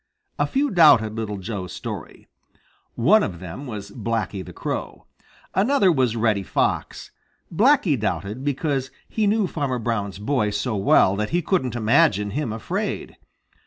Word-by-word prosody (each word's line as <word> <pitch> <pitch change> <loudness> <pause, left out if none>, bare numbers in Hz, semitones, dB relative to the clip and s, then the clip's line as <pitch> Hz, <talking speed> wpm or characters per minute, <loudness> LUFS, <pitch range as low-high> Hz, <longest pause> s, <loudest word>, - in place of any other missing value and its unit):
A - - +2
few 280 0 0
doubted 145 - +5
Little 110 -2 -4
Joe's 95 -3 -5
story. - - -8 0.7
One 195 - +5
of 90 - -3
them 95 +11 -8
was 105 -4 -7
Blacky 105 -5 -3
the - - -10
Crow. - - -5 0.5
Another 205 -2 +3
was 130 -7 +1
Reddy 110 -3 +1
Fox. 95 - -2 0.4
Blacky 205 - +3
doubted 105 +3 -3
because 140 -2 -1 0.2
he 215 -2 0
knew 210 0 +2
Farmer 140 -7 -2
Brown's 105 -4 -2
boy 105 0 0
so 110 +2 -2
well 100 -1 +4
that 105 0 -1
he 175 +1 0
couldn't 140 -9 0
imagine 110 - +3
him 140 0 -2
afraid. 110 0 -4
120 Hz, 145 wpm, -23 LUFS, 105-160 Hz, 0.7 s, doubted